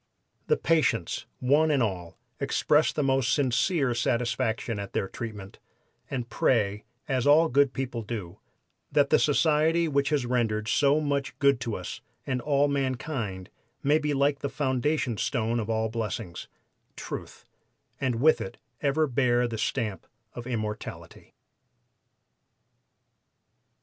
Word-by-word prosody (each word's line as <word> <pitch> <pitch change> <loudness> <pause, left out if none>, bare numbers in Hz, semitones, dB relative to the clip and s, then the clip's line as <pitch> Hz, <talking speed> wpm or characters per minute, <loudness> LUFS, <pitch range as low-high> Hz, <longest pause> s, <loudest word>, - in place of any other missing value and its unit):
"The 460 - +3
patients, 130 - +1
one 145 +5 +3
and 140 -5 +3
all, 90 -6 -4 0.2
express 150 +1 +2
the 150 - -1
most 135 -3 +2
sincere 135 +2 +2
satisfaction 120 -2 -1
at 100 -1 -6
their 95 - -1
treatment, 105 -4 -8 0.5
and 125 -3 -3
pray, 105 -5 +1 0.2
as 130 -1 0
all 160 +3 +6
good 140 +1 +3
people 130 -3 -4
do, 105 -5 -6 0.5
that - - +3
the - - +6
society 160 +2 +3
which 140 -2 +1
has 145 -5 +1
rendered 115 -3 0
so 140 +5 +3
much 140 -3 -2
good 140 -2 +3
to 115 -3 -3
us 90 - -6 0.2
and 130 -2 -1
all 145 +1 +2
mankind 130 - -3 0.3
may 150 +3 +4
be 150 -1 -1
like 140 +1 +2
the 140 - -3
foundation 130 -3 0
stone 115 0 0
of 110 -1 -4
all 110 0 +1
blessings 110 -6 -4 0.5
Truth - - -7 0.5
and 130 -3 0
with 135 +1 +4
it 120 +1 -6 0.2
ever 150 +2 +2
bear 125 -2 +2
the 115 -2 -5
stamp 105 -4 -2 0.3
of 120 0 -7
immortality." 110 -3 -6
125 Hz, 135 wpm, -27 LUFS, 115-145 Hz, 0.5 s, all